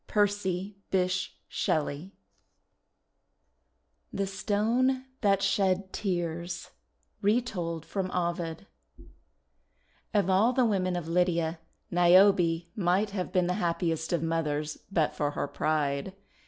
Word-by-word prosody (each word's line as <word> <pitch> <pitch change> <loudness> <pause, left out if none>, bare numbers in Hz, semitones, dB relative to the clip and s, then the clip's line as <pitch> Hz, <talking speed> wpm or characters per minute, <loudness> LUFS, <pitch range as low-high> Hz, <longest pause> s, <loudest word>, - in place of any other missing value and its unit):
PERCY 200 -2 0
BYSSHE 185 0 0
SHELLEY 155 +4 -1 2.0
THE 200 0 -1
STONE 230 +7 +1 0.2
THAT 195 -2 +3
SHED 190 -1 +1
TEARS 175 -3 -3 0.5
Retold 195 -7 0
from 190 -2 -3
Ovid 170 -1 -2 1.5
OF 200 -3 +3
all 200 +6 +4
the 255 -1 +3
women 185 -4 +1
of 175 -2 -4
Lydia, 170 -1 +1 0.3
Niobe 175 -1 +5
might 195 +1 +1
have 185 -3 -3
been 180 -1 +2
the 180 - 0
happiest 165 -1 -1
of 170 -2 0
mothers 155 -2 -1
but 160 -6 +1
for 145 - 0
her - - 0
pride. 150 +3 -1
180 Hz, 105 wpm, -29 LUFS, 165-200 Hz, 2.0 s, Niobe